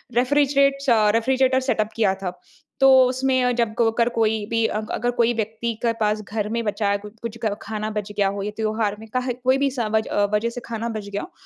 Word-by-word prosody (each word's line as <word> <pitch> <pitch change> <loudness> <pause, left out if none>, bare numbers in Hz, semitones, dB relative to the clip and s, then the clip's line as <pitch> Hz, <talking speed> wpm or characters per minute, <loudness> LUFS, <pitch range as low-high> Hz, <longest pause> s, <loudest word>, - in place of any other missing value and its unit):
Refrigerate 275 +1 +2
अ, 215 -3 +4
refrigerator 260 +3 +2
setup 215 -3 +1
किया 210 -4 +2
था। 180 -1 -5 0.4
तो 270 - +6 0.2
उसमें 260 -1 +1
जब 230 -2 0
क - - +5
अगर 235 0 +2
कोई 220 -1 +1
भी 230 -1 +1
अग 215 0 -5
अगर 245 +2 -1
कोई 235 0 +3
व्यक्ति 225 +1 -3
के 235 - +2
पास 210 0 +1
घर 210 0 -3
में 235 0 -1
बचा 205 0 -1
है, 200 - +2
कुछ-कुछ 215 +2 -9
ग 210 - +1
खाना 215 0 -4
बच 210 0 -4
गया 205 -1 +1
हो 200 +1 -3
या 210 - -3
त्योहार 215 -1 -1
में 220 - -11
का 255 - +2
है 250 -1 -2
कोई 255 +2 +1
भी 280 0 +1
समज 220 -3 -1
अ, 205 - +1
वज़ह 220 +3 +1
से 245 +1 -7
खाना 230 0 -4
बच 215 -3 -5
गया 200 0 -3
हो, 360 - -9
225 Hz, 230 wpm, -22 LUFS, 210-250 Hz, 0.4 s, तो